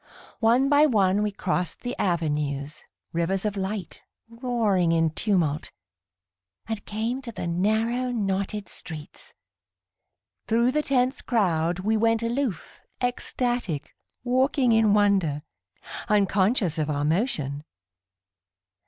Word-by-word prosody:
One 235 +4 +4
by 290 +2 +5
one 200 -5 +3
we 210 - +1
crossed 180 -3 -2
the 245 - -4
avenues, 150 -4 -1 0.3
Rivers 185 +4 0
of 210 -1 -1
light, 195 -2 -4 0.3
roaring 230 -7 +1
in 165 -1 +2
tumult, 160 -5 0 0.9
And 220 -2 -4
came 225 +5 -2
to 245 -3 -7
the 215 - -5
narrow, 220 +8 0
knotted 200 -2 -2
streets. 155 -3 -8 1.1
Thru 235 +2 +3
the 300 +3 +1
tense 260 -2 +1
crowd 175 -6 +1
We 220 +3 +1
went 225 +1 +2
aloof, 235 -3 -3 0.2
ecstatic, 245 - -2 0.3
walking 255 0 +2
in 220 -2 +4
wonder, 190 -8 +2 0.7
Unconscious 200 - +2
of 155 0 -1
our 145 -1 0
motion. 150 - -1
205 Hz, 110 wpm, -25 LUFS, 170-235 Hz, 1.1 s, by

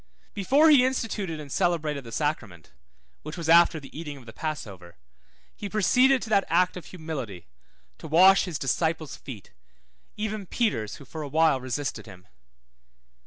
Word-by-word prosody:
Before 275 - +4
he 275 -4 +7
instituted 215 -10 -2
and 145 -2 -9
celebrated 155 -6 0
the 115 - -11
sacrament 115 - -3 0.5
(which 155 +2 -8
was 165 -2 -5
after 170 0 +5
the 140 - -14
eating 150 -2 -6
of 130 - -15
the 110 - -11
passover), 100 - -6 0.6
he 205 - -6
proceeded 250 +6 +3
to 225 - -7
that 200 -2 +4
act 180 +2 +2
of 180 - -9
humility, 145 - -7 0.5
to - - -8
wash 185 +6 +6
his 175 -5 -4
disciples' 160 +2 -1
feet, 110 -9 -11 0.7
even 215 -2 -4
Peter's, 120 - -1
who 140 - -13
for 155 +4 -8
a 150 - -5
while 155 -2 +2
resisted 130 0 -4
him. 90 -3 -14
160 Hz, 160 wpm, -26 LUFS, 135-195 Hz, 0.7 s, he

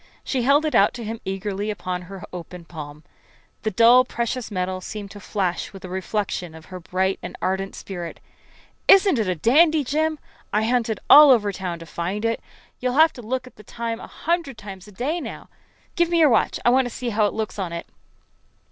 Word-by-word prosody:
She 260 - -1
held 280 +5 +4
it 310 - -1
out 200 - +4
to 240 - -6
him 225 +1 -5
eagerly 195 +2 -3
upon 185 -3 -3
her 190 +1 -10
open 180 0 -8
palm. 150 -2 -9 0.6
The 215 - 0
dull 235 +5 +6
precious 240 -1 -3
metal 185 -2 -2
seemed 205 +1 -7
to 205 - -10
flash 190 -3 -2
with 195 -2 -10
a - - -8
reflection 185 -2 -3
of 160 0 -12
her 185 - -5
bright 190 +2 -1
and - - -7
ardent 190 +1 -2
spirit. 175 -4 -7 0.7
"Isn't 390 - +6
it 215 - 0
a 185 - 0
dandy, 305 - +4
Jim? 310 +4 0 0.3
I 210 +1 +1
hunted 230 -2 0
all 295 0 +10
over 215 -6 +4
town 180 -3 -4
to 165 - -10
find 180 +7 -3
it. 230 0 0 0.4
You'll 250 0 -1
have 320 +1 +6
to 245 - -10
look 255 +3 -3
at 255 - -16
the 210 - -13
time 230 +2 -4
a - - -9
hundred 330 -6 -2
times 195 -2 -10
a - - -13
day 285 - -2
now. - - -8 0.5
Give 345 -1 +2
me 345 - +2
your 315 -3 +6
watch. 225 - +2
I 240 - +6
want 260 0 +3
to - - -5
see 245 +1 -4
how 210 -1 +3
it - - -4
looks 215 -1 -4
on 185 -3 -3
it." 170 0 -5
215 Hz, 210 wpm, -23 LUFS, 185-250 Hz, 0.7 s, all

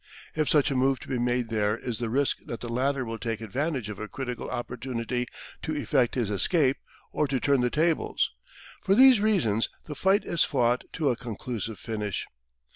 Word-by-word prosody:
If 155 -2 +1
such 145 -2 +4
a - - 0
move 135 +1 +3
be 130 -3 -1
made 120 -1 0
there 105 -1 +1
is 120 -1 -4
the 120 -2 -2
risk 135 +4 +1
that 120 - -5
the 120 - -6
latter 130 +1 0
will 115 0 -5
take 115 0 -2
the 110 - -7
advantage 135 - -2
of 105 -2 -6
a 110 - -4
critical 125 0 -5
opportunity 125 0 -3 0.3
to 155 - -3
effect 135 -4 +1
his 115 -5 0
escape, 135 - +3 0.3
or 150 - +1
to 135 -1 0
turn 140 -1 +3
the 125 - +2
tables. 160 +4 +1 0.5
For 195 - +3
these 260 -1 +8
reasons 175 - +2 0.2
the 150 - -6
fight 195 +6 +2
is 170 - +2
fought 125 -3 +1
to 150 -5 +1
a - - 0
conclusive 115 -2 -5
finish. 105 -3 -3
125 Hz, 195 wpm, -27 LUFS, 115-145 Hz, 0.5 s, these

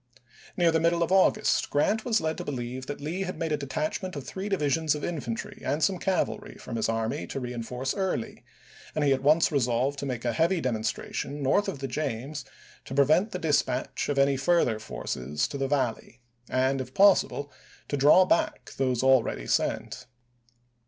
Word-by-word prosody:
Near 170 -2 +4
the 160 - +2
middle 170 +1 +2
of 170 - -2
August 195 +3 +3
Grant 210 +10 +1
was 225 -3 +2
led 160 0 -1
to - - -3
believe 130 -1 -5
that 145 - -5
Lee 160 +6 -3
had 185 -1 -3
made 165 -1 -2
a 150 - +1
detachment 155 +6 -3
of 140 -2 -6
three 195 +2 -5
divisions 160 -4 +1
of 150 - -6
infantry 135 -9 -4
and 150 +2 -1
some 185 +3 +2
cavalry 200 +3 -1
from 115 - -7
his 110 0 0
army 115 -6 -2
to - - -4
reenforce 125 +1 -4
Early, 190 - -3 0.5
and 155 - +1
he 140 - +4
at 135 - -2
once 155 +5 +4
resolved 130 0 +1
to 140 - -3
make 125 -2 -4
a 120 - +1
heavy 170 +8 +2
demonstration 130 +3 -3
north 200 +10 +2
of 195 - -3
the 135 0 -4
James 135 +1 -3 0.4
to 135 - -6
pre 140 0 +5
vent 170 - +3
the 185 - -4
dispatch 145 -7 0
of 145 - -1
any 140 0 +3
further 135 -6 +2
forces 65 - -3
to - - -5
the 135 - 0
Valley, 130 -3 -2 0.3
and, 130 +1 +1
if 130 0 -9
possible, 190 -7 +4 0.4
to - - -2
draw 145 +7 +6
back 175 - 0
those 130 -2 0
already 130 - +3
sent. - - -1
140 Hz, 185 wpm, -27 LUFS, 125-165 Hz, 0.5 s, draw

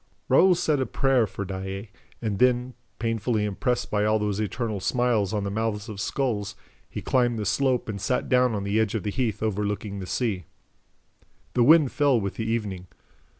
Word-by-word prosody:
Raoul 180 +8 +6
said 155 -4 +1
a 130 - 0
prayer 135 -5 +2
for 100 +1 -5
Daae 95 +2 -6 0.3
and 105 -3 -2
then, 125 0 +2 0.2
painfully 115 -1 0
impressed 120 +5 -1
by 105 -1 +1
all 110 +1 +3
those 105 -1 -1
eternal 110 0 -2
smiles 115 -2 +1
on 105 -2 -1
the 100 - -3
mouths 110 0 -2
of 100 -2 -5
skulls, 110 -5 -2 0.3
he - - -6
climbed 120 -3 +2
the 105 - -3
slope 125 +5 +1
and 100 -3 -5
sat 125 +5 0
down 125 -3 +3
on 100 - -2
the 100 +2 +1
edge 110 0 0
of 105 - -2
the 105 - -2
heath 115 -2 -1
overlooking 105 -1 -2
the 95 - -6
sea. 100 -8 -1 1.1
The 125 - +2
wind 150 0 +6
fell 140 -5 +3
with 100 -2 -3
the 110 0 -3
evening. 100 -6 -3
110 Hz, 190 wpm, -25 LUFS, 100-125 Hz, 1.1 s, Raoul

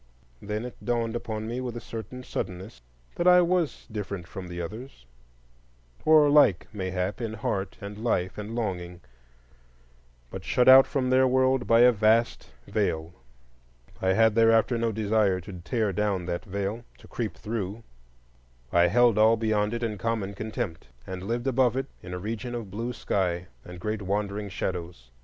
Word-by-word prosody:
Then 105 +3 -4
it 125 - -10
dawned 115 -1 -1
upon 110 -2 -4
me 120 +3 -3
with 120 -2 -4
a - - -4
certain 115 +2 -8
suddenness 95 - -6 0.4
that 175 - +1
I 180 0 +8
was 175 -3 0
different 100 -4 -5
from 95 -1 -8
the 90 0 -7
others; 105 - -8 1.0
or 155 -1 +7
like, 145 - +5
mayhap, 95 +1 -3
in 115 -2 -3
heart 100 -2 -3
and 100 +1 -8
life 95 -6 0
and 105 +2 -6
longing, 90 -6 -4 1.3
but - - -7
shut 125 - +2
out 130 +1 +9
from 130 -2 -1
their 130 0 +5
world 130 0 +2
by 115 +1 +5
a 125 0 +8
vast 110 +1 +2 0.2
veil. 80 +2 -1 0.9
I 95 0 +2
had 110 +2 +4
thereafter 115 +1 +4
no 115 -1 0
desire 105 -3 +1
to 95 +3 -10
tear 105 +2 -1
down 100 -2 -1
that 85 -1 -4
veil, 100 +3 -3
to - - -16
creep 115 -3 -4
through; 105 0 -4 0.9
I 85 0 +5
held 120 +2 +4
all 110 +1 +5
beyond 110 -2 +1
it 120 - -4
in 105 -3 -3
common 110 -4 -2
contempt, 100 -5 -5 0.2
and 95 -1 -6
lived 120 +5 -3
above 130 -2 +2
it 135 - -1 0.2
in 90 - -9
a 90 - -3
region 115 +5 -4
of 110 -5 -6
blue 115 +5 -3
sky 90 -5 -1 0.2
and 90 0 -10
great 105 +1 -3
wandering 100 +1 -2
shadows. 85 -9 -5
110 Hz, 165 wpm, -27 LUFS, 95-120 Hz, 1.3 s, out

